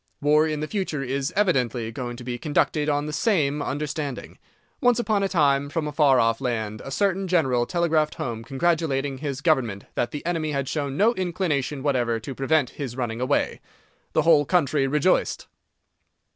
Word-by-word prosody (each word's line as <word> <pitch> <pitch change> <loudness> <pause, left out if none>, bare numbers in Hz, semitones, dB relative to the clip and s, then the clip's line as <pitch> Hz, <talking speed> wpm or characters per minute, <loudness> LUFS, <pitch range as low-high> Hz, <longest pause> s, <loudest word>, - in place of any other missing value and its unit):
War 150 +2 +4
in 155 -1 -2
the 155 - -2
future 185 -9 -2
is 135 +1 -2
evidently 130 - +1
going 120 0 -5
to 125 - -9
be 120 0 -4
conducted 150 +2 +1
on 145 0 0
the 150 - -5
same 150 -9 +1
understanding. 145 -1 -4 0.4
Once 245 -1 +4
upon 220 -4 +1
a 195 - 0
time, 145 -5 +2
from 155 +1 -2
a - - -3
far 145 -3 +4
off 115 +2 +2
land, 110 -4 -2
a - - -7
certain 195 +5 0
general 130 -9 +2
telegraphed 165 -3 +1
home 115 -2 -4
congratulating 140 -1 0
his 140 -2 -4
Government 125 - +1
that 120 - -1
the 145 +4 -7
enemy 160 -3 -1
had 140 -1 -1
shown 140 -2 -3
no 225 +4 +4
inclination 155 - -2
whatever 120 -5 +1
to 130 +4 -7
prevent 135 +1 +1
his 130 -4 -6
running 120 -2 -3
away. 130 - 0 0.5
The - - +3
whole 160 -3 +5
country 145 -4 +1
rejoiced. 150 +6 +1
145 Hz, 175 wpm, -24 LUFS, 130-160 Hz, 0.5 s, whole